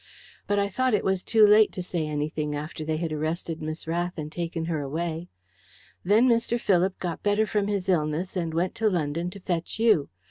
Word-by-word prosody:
But 205 - +1
I 200 0 +2
thought 255 +4 +1
it - - 0
was 190 -1 +1
too 220 +1 +5
late 210 +1 +6
to 180 - -4
say 170 -3 -2
anything 150 0 -2
after 155 +2 -5
they 155 0 -1
had 160 -1 -2
arrested 160 +1 -3
Miss 155 +1 -5
Rath 175 +2 -2
and 155 -1 -5
taken 165 -1 -3
her 160 -3 -1
away. 165 +4 -3 0.7
Then 215 +7 +4
Mr. 235 0 +2
Philip 190 -2 +2
got 175 -3 -4
better 205 +1 +2
from 210 -1 0
his 200 -3 -2
illness 170 +1 0
and 170 -3 -1
went 170 +3 0
to 220 - +4
London 170 -1 -1
to 200 - -10
fetch 175 -3 -3
you. 220 -10 +3
175 Hz, 205 wpm, -26 LUFS, 155-200 Hz, 0.7 s, late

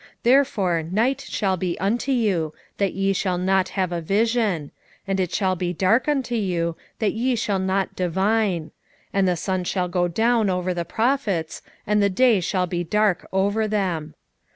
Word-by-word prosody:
3:6 - - -21 0.2
Therefore 230 -10 +3
night 225 +11 0
shall 195 -8 -1
be 180 -1 -2
unto 230 +8 0
you, 190 - 0 0.2
that 200 -2 +1
ye 195 0 +1
shall 185 -1 -1
not 190 +1 +1
have 185 -2 0
a 170 -1 -2
vision; 205 -4 0 0.3
and 195 -1 -1
it 185 -2 0
shall 190 -3 +1
be 175 0 -2
dark 205 - +2
unto 270 -4 0
you, 175 -6 -1 0.2
that 215 - 0
ye 245 +3 0
shall 205 -3 -1
not 190 +1 -1
divine; 190 -2 0 0.4
and 195 -1 +2
the 180 -1 +1
sun 185 +1 -2
shall 180 0 -1
go 175 0 0
down 220 +4 +2
over 180 0 -1
the 170 -1 -3
prophets, 220 - -1 0.2
and 210 0 +2
the 200 - +3
day 230 +2 +4
shall 180 +1 0
be 175 0 -2
dark 210 +1 +1
over 205 +3 +1
them. 180 -7 -2
190 Hz, 175 wpm, -23 LUFS, 180-220 Hz, 0.4 s, day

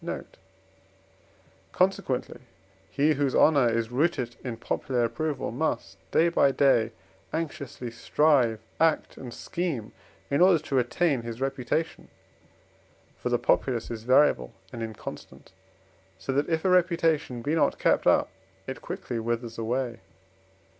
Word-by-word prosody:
note); - - -6 1.4
consequently, 180 -9 0 0.5
he 145 +8 +2
whose 140 -2 0
honour 140 -6 +5
is 115 0 -1
rooted 130 -4 0
in 120 -3 -4
popular 125 +1 -1
approval 135 +4 -2
must, 150 +7 -2
day 165 - +4
by 165 -4 +4
day, 130 -5 +3 0.4
anxiously 140 -6 -4
strive, 125 -2 +2 0.2
act, 160 -1 +2
and 125 -2 -8
scheme 145 -5 -4 0.4
in 140 +4 +2
order 180 -1 +7
to 155 -2 -8
retain 135 +2 +1
his 115 0 -7
reputation. 135 +4 -2 1.1
For - - -2
the - - +2
populace 120 -4 0
is 115 -2 -5
variable 120 - +3 0.2
and 120 - -6
inconstant, 110 -1 -8 0.7
so 135 - -4
that, 140 +4 0
if 160 +1 0
a - - +4
reputation 165 -8 +2
be 145 - 0
not 150 -3 +2
kept - - +2
up, - - +4 0.3
it 130 - -6
quickly 170 - -5
withers 115 0 -3
away. 120 +1 -2
135 Hz, 130 wpm, -27 LUFS, 120-160 Hz, 1.4 s, order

